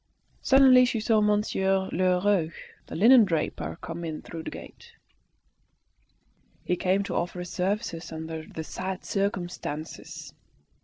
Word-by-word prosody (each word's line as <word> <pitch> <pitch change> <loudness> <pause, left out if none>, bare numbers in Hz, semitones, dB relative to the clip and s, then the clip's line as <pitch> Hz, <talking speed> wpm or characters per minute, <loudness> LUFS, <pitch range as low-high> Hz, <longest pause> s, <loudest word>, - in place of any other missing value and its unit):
Suddenly 265 -2 +6
she 245 -2 -1
saw 220 0 +2
Monsieur 195 -2 +1
Lheureux, 185 -1 +2 0.4
the - - -7
linendraper, 170 - +3
come 170 +1 -6
in 160 -2 -5
through 165 - -7
the - - -6
gate. 470 0 -12 1.7
He 180 - +1
came 190 +2 +1
to - - -5
offer 175 +1 -2
his 180 -1 -6
services 180 -3 -2
"under 160 0 -6
the 160 - -6
sad 185 +3 -5
circumstances." 175 -6 -4
185 Hz, 120 wpm, -27 LUFS, 165-210 Hz, 1.7 s, Suddenly